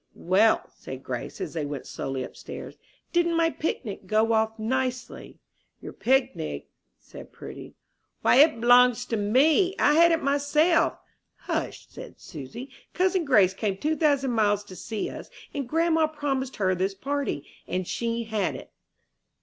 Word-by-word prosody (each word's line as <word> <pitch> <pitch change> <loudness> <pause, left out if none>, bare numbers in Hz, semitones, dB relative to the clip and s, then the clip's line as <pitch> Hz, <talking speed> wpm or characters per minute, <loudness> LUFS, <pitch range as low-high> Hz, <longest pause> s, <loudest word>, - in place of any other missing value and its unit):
"Well," 200 +5 +3
said - - -9
Grace, - - -5
as 380 - -5
they 160 - -2
went 145 -1 -5
slowly 135 -1 -4
upstairs, - - -9 0.4
"didn't 340 -1 +2
my 330 0 +3
picnic 215 -12 -4
go 220 +3 +2
off 220 0 +1
nicely?" 255 +3 -3 0.4
"Your - - -9
pignig?" 220 - 0 0.3
said - - -13
Prudy; - - -10 0.5
"why - - +5
it 295 -4 +6
b'longs 245 0 +5
to 230 - 0
me! 290 - +3
I 295 - +4
had 335 +2 +6
it 330 - +1
myself." 290 +4 +2 0.4
"Hush," - - -4
said - - -11
Susy. 190 - -9 0.2
"Cousin 370 -1 +1
Grace 205 -9 +4
came 195 -1 -2
two 310 +9 0
thousand 285 -5 +2
miles 205 -3 +2
to 190 -3 -12
see 215 +4 -4
us, - - -8 0.2
and 275 -4 -4
grandma 325 0 +2
promised 275 -4 -3
her 190 -2 +1
this 190 +2 -1
party, 275 - -3 0.2
and 185 -1 -2
she 235 0 -2
had 220 -2 -2
it." - - -10
250 Hz, 150 wpm, -26 LUFS, 205-300 Hz, 0.5 s, it